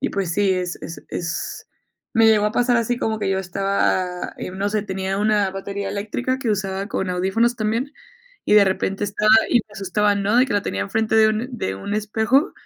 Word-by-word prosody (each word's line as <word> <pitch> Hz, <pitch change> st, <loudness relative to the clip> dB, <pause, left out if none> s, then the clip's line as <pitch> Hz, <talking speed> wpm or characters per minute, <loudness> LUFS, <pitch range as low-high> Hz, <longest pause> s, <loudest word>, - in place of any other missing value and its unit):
Y 280 Hz, -, -1 dB
pues, 195 Hz, -4 st, -2 dB
sí, 200 Hz, +1 st, +2 dB
es 180 Hz, -1 st, -2 dB
es 165 Hz, -, -8 dB
es 170 Hz, -1 st, -4 dB, 0.5 s
Me 225 Hz, -1 st, +5 dB
llegó 215 Hz, -2 st, +4 dB
a 210 Hz, -, 0 dB
pasar 245 Hz, 0 st, +2 dB
así 235 Hz, +1 st, 0 dB
como 220 Hz, -2 st, -1 dB
que 195 Hz, -, -1 dB
yo 190 Hz, -, +1 dB
estaba, 185 Hz, -1 st, -1 dB
eh, -, -, -5 dB
no 195 Hz, +2 st, -1 dB
sé, 215 Hz, 0 st, -1 dB
tenía 190 Hz, -1 st, -3 dB
una 210 Hz, -2 st, +2 dB
batería 195 Hz, +1 st, -5 dB
eléctrica 220 Hz, +6 st, -2 dB
que 255 Hz, -4 st, -1 dB
usaba 195 Hz, -1 st, -2 dB
con 190 Hz, -4 st, -2 dB
audífonos 195 Hz, +7 st, +1 dB
también, 230 Hz, +6 st, -1 dB, 0.5 s
y -, -, 0 dB
de 210 Hz, -1 st, +7 dB
repente 190 Hz, +1 st, -1 dB
estaba 210 Hz, +1 st, +2 dB, 0.2 s
y -, -, -2 dB
me 215 Hz, -2 st, -1 dB
asustaban, 200 Hz, +1 st, 0 dB
¿no?, 205 Hz, +4 st, +2 dB
de 250 Hz, -, +6 dB
que -, -, -3 dB
la 205 Hz, -, +2 dB
tenía 95 Hz, -, -2 dB
en 100 Hz, -, -7 dB
frente 220 Hz, 0 st, +1 dB
de 220 Hz, 0 st, +6 dB
un 215 Hz, +3 st, -1 dB
de 95 Hz, -, -2 dB
un 200 Hz, -, -5 dB
espejo, 220 Hz, +6 st, +1 dB
205 Hz, 220 wpm, -21 LUFS, 190-220 Hz, 0.5 s, de